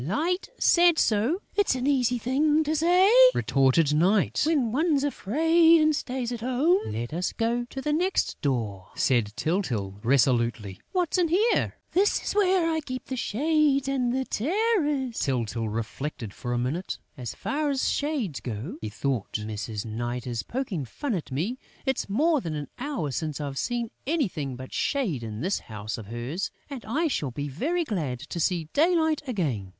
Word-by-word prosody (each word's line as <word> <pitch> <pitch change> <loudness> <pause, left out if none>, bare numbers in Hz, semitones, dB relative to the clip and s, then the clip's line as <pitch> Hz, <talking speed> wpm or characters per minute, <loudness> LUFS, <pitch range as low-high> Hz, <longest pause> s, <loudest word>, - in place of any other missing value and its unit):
"Light 320 - -1
said 345 -1 +5
so...." 235 - +1
"It's 405 -9 +2
an 255 0 -2
easy 255 -3 +2
thing 295 +6 +2
to 310 +1 -1
say," 350 +5 +4 0.3
retorted 140 +3 +3
Night, 185 +6 +2
"when 280 -8 +2
one's 295 +1 +2
afraid 325 - +4
and 310 -1 +3
stays 250 -3 -3
at 240 - -4
home!" 260 - +2
"Let 120 +4 -4
us 180 +3 -1
go 235 +1 0
to 265 +2 -7
the 300 - 0
next 365 +5 0
door," 110 -9 -2
said 120 -5 +2
Tyltyl, 115 - -2
resolutely. 120 -5 +1
"What's 360 -1 +1
in 350 - +3
here?" 405 +8 +2 0.2
"This 400 +3 +2
is - - -2
where 375 -4 +3
I 320 -1 +1
keep 255 -3 -6
the 260 - -4
Shades 280 +3 +1
and 260 -3 0
the 260 +1 -1
Terrors!" 300 - 0
Tyltyl 115 -4 -1
reflected 115 +1 -5
for 120 - -5
a 120 - 0
minute: 140 +10 -2 0.2
"As 125 -5 -6
far 295 +1 -1
as 270 -2 0
Shades 270 - -1
go," 105 0 -5
he 110 - -4
thought, 125 0 -2
"Mrs. 105 0 -4
Night 120 +2 -4
is 120 -3 -2
poking 230 - -3
fun 240 - -4
at 170 -7 -4
me. 190 - -2 0.3
It's 265 -5 -1
more 300 +8 +2
than 160 -6 -4
an 145 -2 -5
hour 260 - -2
since 155 +1 -3
I've 140 -2 -4
seen 240 -2 -2 0.2
anything 180 - -1
but 130 +1 -9
shade 220 - 0
in 110 -1 -6
this 190 +4 0
house 105 +1 -6
of 105 - -9
hers; 120 - -3 0.2
and 265 -4 -6
I 300 +10 0
shall 150 - -1
be 145 +4 -4
very 300 - -1
glad 155 - -3
to 170 - -4
see 170 -1 0
daylight 320 -1 +3
again. 145 - -2
225 Hz, 175 wpm, -26 LUFS, -, 0.3 s, said